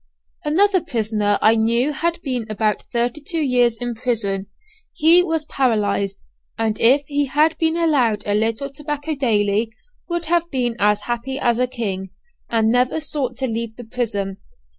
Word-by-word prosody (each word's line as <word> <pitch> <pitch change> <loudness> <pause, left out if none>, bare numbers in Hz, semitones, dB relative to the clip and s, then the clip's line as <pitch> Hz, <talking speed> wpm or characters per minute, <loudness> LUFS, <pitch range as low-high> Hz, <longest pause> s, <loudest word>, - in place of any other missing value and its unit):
Another 375 +5 +3
prisoner 215 -8 0
I 220 - +6
knew 235 +6 +1
had 335 +4 -1
been 250 -5 -3
about 215 0 -1
thirty 240 +5 -1
two 330 +3 -2
years 245 -4 +3
in 245 0 -3
prison 215 -5 -1 0.5
he 330 +3 +6
was 325 -3 -1
paralyzed, 205 -8 0 0.3
and 225 -1 -1
if 275 +5 +5
he 285 0 -1
had 305 +4 +2
been 325 0 +1
allowed 255 -11 +2
a 205 - 0
little 225 +6 0
tobacco 295 +2 -4
daily, 220 -5 +1 0.4
would 345 0 -2
have 340 +1 +1
been 245 -5 -1
as 210 0 +2
happy 240 +4 -3
as 240 -3 +1
a 250 - +2
king, 195 -6 -4 0.4
and 225 -1 +2
never 250 +5 +2
sought 275 -5 -3
to 265 - -1
leave 230 -2 -3
the 245 - -9
prison. 210 -5 -3
245 Hz, 160 wpm, -20 LUFS, 220-290 Hz, 0.5 s, I